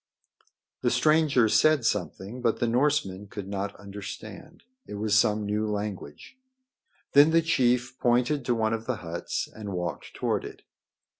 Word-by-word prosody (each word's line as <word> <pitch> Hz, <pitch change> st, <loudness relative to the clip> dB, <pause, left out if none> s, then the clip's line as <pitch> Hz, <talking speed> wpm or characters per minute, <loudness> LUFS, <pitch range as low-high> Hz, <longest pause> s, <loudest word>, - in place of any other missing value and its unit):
The -, -, +2 dB
stranger 155 Hz, -6 st, +3 dB
said 155 Hz, +3 st, +3 dB
something, 100 Hz, -, -2 dB
but 115 Hz, -2 st, +1 dB
the -, -, +1 dB
Norsemen 115 Hz, -6 st, 0 dB
could 100 Hz, -1 st, -7 dB
not 100 Hz, 0 st, -4 dB
understand. 100 Hz, -, -9 dB, 0.2 s
It -, -, -7 dB
was 105 Hz, 0 st, -1 dB
some 105 Hz, -1 st, +3 dB
new 105 Hz, +1 st, -1 dB
language. 105 Hz, -, -6 dB, 0.7 s
Then 145 Hz, +2 st, +7 dB
the 165 Hz, 0 st, +3 dB
chief 125 Hz, -5 st, +1 dB
pointed 125 Hz, +4 st, +2 dB
to 120 Hz, -, +1 dB
one 110 Hz, 0 st, 0 dB
of 115 Hz, 0 st, -4 dB
the 130 Hz, -, 0 dB
huts 85 Hz, +1 st, -3 dB
and 105 Hz, -3 st, -6 dB
walked 90 Hz, -1 st, -5 dB
toward -, -, -1 dB
it. -, -, -10 dB
110 Hz, 150 wpm, -27 LUFS, 100-130 Hz, 0.7 s, Then